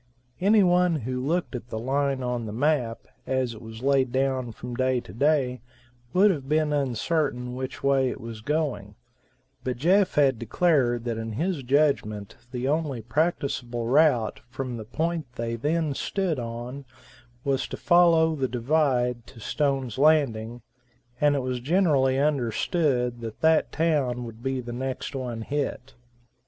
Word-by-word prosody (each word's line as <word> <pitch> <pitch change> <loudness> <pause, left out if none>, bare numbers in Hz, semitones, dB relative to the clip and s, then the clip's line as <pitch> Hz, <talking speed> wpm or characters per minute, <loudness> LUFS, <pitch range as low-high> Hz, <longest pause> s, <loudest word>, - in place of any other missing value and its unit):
Any 205 +2 +5
one 180 -1 +3
who 125 +2 -3
looked 165 +4 -1
at 120 -1 -6
the - - -4
line 135 +2 0
on 120 -2 -2
the - - -5
map, 125 -1 0 0.3
as 130 -2 0
it 110 - -11
was 110 +1 -10
laid 135 -2 +2
down 130 -2 0
from 120 +2 -8
day 130 +1 +1
to 90 - -11
day, 130 -1 +1 0.5
would 195 +3 +5
have 140 -6 -5
been 155 -1 +2
uncertain 135 -1 -1
which 130 0 -6
way 135 -2 +3
it - - -6
was 115 -1 -8
going; 135 -7 -2 0.7
but 125 -2 -2
Jeff 185 +8 +3
had 135 -5 +3
declared 120 -3 +2
that 115 -2 -3
in 110 -1 -4
his 165 - -1
judgment 125 -7 +1 0.2
the 125 0 -2
only 145 -5 -1
practicable 125 -4 -1
route 125 -3 +3
from 130 0 -4
the 110 - -7
point 160 +5 -2
they 115 -1 -2
then 150 +4 0
stood 175 0 -1
on 120 +4 -6 0.6
was 135 -1 0
to - - -6
follow 170 -2 +4
the 135 -4 -1
divide 125 -2 0
to 130 -3 -14
Stone's 135 -1 -1
Landing, 120 -6 +2 0.6
and 145 -1 +4
it 135 - -1
was 130 -1 -2
generally 140 -3 +2
understood 135 - 0
that 115 -1 -7
that 160 0 +3
town 145 -7 0
would 115 -1 -10
be 135 0 -2
the 120 0 -7
next 130 +3 -4
one 120 -4 -4
hit. 140 -1 -3
130 Hz, 155 wpm, -26 LUFS, 120-150 Hz, 0.7 s, Any